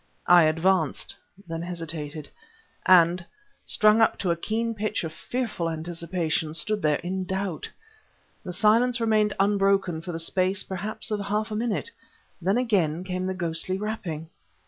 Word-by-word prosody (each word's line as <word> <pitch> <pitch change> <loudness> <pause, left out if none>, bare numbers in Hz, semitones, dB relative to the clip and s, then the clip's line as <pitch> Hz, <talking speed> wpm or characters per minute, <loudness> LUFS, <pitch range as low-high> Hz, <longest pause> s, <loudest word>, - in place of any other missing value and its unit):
I 175 -2 +7
advanced; 160 0 +1 0.3
then 165 -1 -4
hesitated, 160 -4 -5 0.6
and, 180 0 +6 0.4
strung 215 +1 +4
up 225 - +3
to 180 - 0
a - - +2
keen 225 +6 -1
pitch 215 -2 -2
of 160 -1 -5
fearful 220 -9 -3
anticipation, 165 -1 -2
stood 205 +7 +1
there 150 -2 +2
in 185 +1 -2
doubt. 190 -2 -3 0.7
The 185 - -5
silence 225 +6 +3
remained 215 -2 +2
unbroken 195 -4 +2
for 175 - -6
the 165 - -4
space, 185 +3 +1
perhaps 200 +4 -5
of 210 - 0
half 210 +2 -2
a - - -2
minute. 235 - -2 0.5
Then 195 +6 +2
again 180 -9 +1
came 185 0 -3
the 190 - -2
ghostly 170 +1 -2
rapping. 190 -7 -4
185 Hz, 145 wpm, -26 LUFS, 165-210 Hz, 0.7 s, I